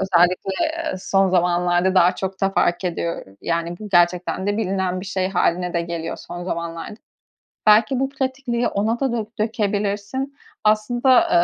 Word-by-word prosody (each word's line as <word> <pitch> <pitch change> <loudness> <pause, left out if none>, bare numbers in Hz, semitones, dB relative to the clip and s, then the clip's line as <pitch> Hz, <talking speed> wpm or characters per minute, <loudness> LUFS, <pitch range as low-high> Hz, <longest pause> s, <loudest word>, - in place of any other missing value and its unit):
özellikle, 185 0 +2
eee, 325 0 -2
son 195 +1 +2
zamanlarda 175 +1 +2
daha 180 -1 +5
çok 190 0 -4
da 195 - +2
fark 175 -1 +1
ediyor, 170 -1 -3
yani, 170 +1 -2
bu 215 - -8
gerçekten 180 +1 +2
de 205 0 0
bilinen 190 -3 -1
bir 190 - -8
şey 190 -1 -1
hâline 180 -1 0
de 170 - +2
geliyor 170 -1 -4
son 175 0 -8
zamanlarda. 170 +3 -5 0.7
Belki 220 +4 +5
bu 270 - 0
pratikliği 260 -3 -1
ona 220 +4 -1
da 270 -3 0
dö 230 -2 -2
dökebilirsin. 210 +4 -1 0.3
Aslında, 240 +4 +3
195 Hz, 150 wpm, -21 LUFS, 175-220 Hz, 0.7 s, daha